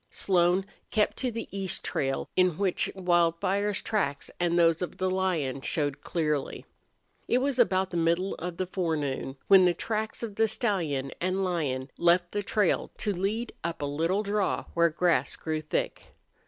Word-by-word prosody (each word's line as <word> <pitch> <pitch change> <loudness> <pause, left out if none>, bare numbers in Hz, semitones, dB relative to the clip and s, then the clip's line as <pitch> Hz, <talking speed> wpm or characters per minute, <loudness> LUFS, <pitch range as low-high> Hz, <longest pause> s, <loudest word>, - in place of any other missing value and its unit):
Slone 180 0 +2 0.2
kept 215 -2 +1
to 255 - -1
the 230 0 -5
east 195 -2 -2
trail, 135 -1 -1
in 180 -3 +3
which 195 -3 +1
Wildfire's 185 +3 +1
tracks 145 -10 -1
and 175 -1 +1
those 165 -1 +4
of 180 - -4
the 185 0 0
lion 170 -8 -1
showed 145 -1 -1
clearly. 150 -5 -2 0.6
It 245 - +3
was 260 0 0
about 190 -5 +3
the 175 - -2
middle 170 +3 +1
of 175 0 -5
the 185 - -1
forenoon 150 -7 -2
when 190 -2 +7
the 175 -1 +3
tracks 220 +4 -3
of 215 -3 -5
the 225 0 +4
stallion 170 - -1
and 185 +2 0
lion 140 -8 -2
left 175 +1 +3
the 205 - -1
trail 205 -1 +1
to 205 - 0
lead 210 +6 -2
up 170 -3 -3
a - - +1
little 165 +8 0
draw 205 -1 0
where 170 0 +4
grass 170 +2 +1
grew 155 -1 -3
thick. 155 - -3
180 Hz, 170 wpm, -28 LUFS, 165-200 Hz, 0.6 s, when